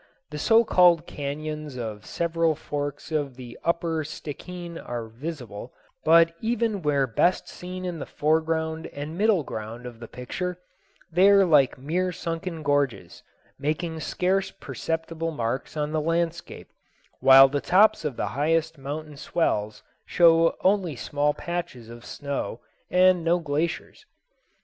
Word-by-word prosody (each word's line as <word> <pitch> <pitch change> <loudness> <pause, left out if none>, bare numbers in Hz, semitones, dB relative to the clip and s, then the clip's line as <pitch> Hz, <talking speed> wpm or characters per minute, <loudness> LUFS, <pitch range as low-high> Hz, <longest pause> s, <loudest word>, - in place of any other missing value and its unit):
The 150 - -5
so 225 +8 +5
called 175 -5 +5
cañons 150 -1 -5
of 110 -3 -6
several 165 -1 0
forks 145 +1 -5
of 145 -4 -1
the 120 -2 -10
upper 165 -1 0
Stickeen 170 +3 -7
are 120 -2 -5
visible, 120 -2 -8 0.3
but 165 +1 +6
even 225 -3 0
where 145 -3 +2
best 130 +9 +1
seen 185 +1 -7
in 175 -3 -4
the - - -6
foreground 160 +1 0
and 145 +3 -6
middle 205 -3 +3
ground 115 +1 -7
of 120 -2 -9
the 115 - -9
picture, 180 +10 -5 0.5
they 185 +4 +5
are 200 -1 +6
like 150 -6 +4
mere 175 +7 -1
sunken 165 -1 -5
gorges, 130 - -1 0.4
making 160 +3 -2
scarce 190 +4 0
perceptible 165 +4 -4
marks 130 0 -3
on 150 0 -1
the 155 0 0
landscape, 170 +1 -2 0.5
while 135 +1 +9
the 140 +1 -2
tops 210 +3 +4
of 150 -5 -2
the - - -1
highest 160 +2 0
mountain 150 +2 -6
swells 110 -9 -1 0.2
show 165 -1 +4
only 185 -5 +2
small 145 +3 0
patches 170 -10 -5
of 120 0 -11
snow 140 -4 -4 0.3
and 180 -1 +4
no 170 +1 +3
glaciers. 160 - -3
160 Hz, 140 wpm, -25 LUFS, 140-170 Hz, 0.5 s, while